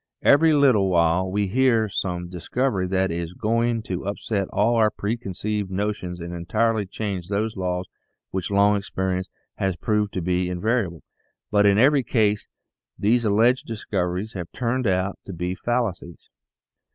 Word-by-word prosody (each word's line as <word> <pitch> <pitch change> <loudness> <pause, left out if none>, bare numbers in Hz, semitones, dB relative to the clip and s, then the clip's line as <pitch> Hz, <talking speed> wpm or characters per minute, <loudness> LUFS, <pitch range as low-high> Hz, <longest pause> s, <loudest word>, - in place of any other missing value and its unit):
Every 160 +3 +6
little 130 -10 +4
while 85 +1 +2
we 100 +2 0
hear 115 +2 +3
of 100 - -9
some 90 -2 -2
discovery 95 - -1
that 95 0 +1
is 85 0 -4
going 115 +1 0
to 95 -2 -4
upset 100 -1 -2
all 115 +2 +1
our 110 -1 +4
pre 105 +2 -2
conceived 105 -2 -3
notions 95 -2 -3
and 85 +1 -6
entirely 110 +5 0
change 95 -3 -4
those 105 +3 -1
laws 90 -1 -2 0.5
which 95 -2 -3
long 100 +1 +4
experience 95 -2 -2 0.3
has 95 -2 0
proved 105 +1 0
to 95 - -2
be 90 +1 0
invariable, 90 -2 -1 0.5
but 105 -1 +4
in 100 0 +4
every 135 +5 +5
case 105 -4 +1 0.5
these 115 +3 +2
alleged 115 +5 +3
discoveries 100 -2 -3
have 90 -3 -6
turned 125 0 -1
out 95 +1 0
to 95 - -6
be 90 +2 -3
fallacies. 95 -5 -3
100 Hz, 155 wpm, -24 LUFS, 90-110 Hz, 0.5 s, Every